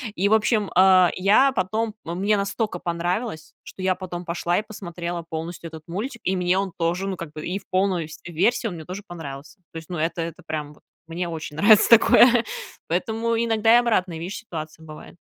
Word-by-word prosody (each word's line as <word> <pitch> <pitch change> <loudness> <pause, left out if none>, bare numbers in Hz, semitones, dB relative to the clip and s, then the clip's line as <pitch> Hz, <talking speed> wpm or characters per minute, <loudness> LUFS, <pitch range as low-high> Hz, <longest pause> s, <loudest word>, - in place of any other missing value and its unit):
И, 195 +3 +1
в 220 - +4
общем, 215 -1 +2
а, 185 -1 +6
я 205 +9 +4
потом 215 +1 -1
мне 190 +5 0
настолько 200 -1 -2
понравилось, 175 +2 -3
что 190 - -11
я 185 0 +3
потом 180 -1 -6
пошла 170 +1 -1
и - - +1
посмотрела 175 -5 -6
полностью 165 +1 -5
этот 160 -1 -10
мультик, 225 +8 -5
и 190 - 0
мне 180 +1 +1
он 195 -1 -1
тоже, 175 +3 0
ну, 190 -2 -3
как 165 -3 -7
бы 155 - -7
и 190 +3 -2
в 195 - -24
полной, 185 -3 +1
всь 155 - -12
версии 190 +8 +1
он 205 - -4
мне 160 -2 -9
тоже 190 +4 -7
понравился. 140 -3 -9
То 165 - -6
есть, 160 +2 -10
ну, 175 - -4
это 165 +1 -1
это 165 -1 -6
прям, 150 -2 -4
вот - - -24 0.2
мне 170 +2 -3
очень 160 -2 -6
нравится 210 +5 +6
такое, 235 +1 +6 0.4
поэтому 225 +7 -1
иногда 225 0 +3
и - - +7
обратные, 190 -8 0
видишь, 180 +5 -5
ситуации 160 -7 -8
бывают. 155 +1 -12
180 Hz, 205 wpm, -23 LUFS, 165-210 Hz, 0.4 s, и